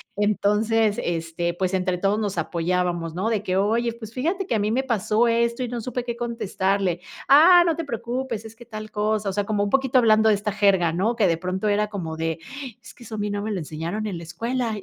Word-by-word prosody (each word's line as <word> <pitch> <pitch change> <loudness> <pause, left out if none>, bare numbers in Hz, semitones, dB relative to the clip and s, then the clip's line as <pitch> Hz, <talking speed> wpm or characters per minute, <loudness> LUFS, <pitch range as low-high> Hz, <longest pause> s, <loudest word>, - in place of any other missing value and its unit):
Entonces, 210 +1 +2
este, 170 0 -2
pues, 185 +1 -2
entre 185 -1 0
todos 195 +3 +1
nos 205 -4 -2
apoyábamos, 170 0 -1
¿no? 190 +5 -1
De 210 -3 0
que: 185 -2 0
"Oye, 230 +4 +1
pues, 225 -1 -10
fíjate 350 +9 -1
que - - 0
a 215 - +1
mí 210 +1 0
me 260 +3 +1
pasó 230 -1 +1
esto, 235 +1 +1
y 250 - -1
no 240 -1 -4
supe 250 +1 -4
qué 235 -1 -3
contestarle. 195 -6 -1 0.3
Ah, 345 +5 +8
no 330 - +2
te 330 - -3
preocupes, 235 -3 -4
es 220 - -10
que 240 +1 -14
tal 215 -1 -8
cosa". 210 0 0
O 195 - -1
sea, 205 +1 0
como 205 -1 0
un - - -2
poquito 265 +1 +2
hablando 220 -2 +5
de 210 - +5
esta 205 0 -3
jerga, 190 -5 +3
¿no? 220 +7 0
Que 205 - +4
de 165 - +2
pronto, 185 +4 -2
era 210 +1 +2
como 175 -6 -5
de: 160 0 -2 0.4
"Es - - -13
que 245 - -15
eso, 225 -2 -7
a - - -5
mí 205 0 -2
no 205 0 -2
me 215 - -3
lo 190 - -2
enseñaron 165 +8 -4
en 185 -4 -4
la 170 - -9
escuela". 230 +6 -2
210 Hz, 245 wpm, -24 LUFS, 185-235 Hz, 0.4 s, Ah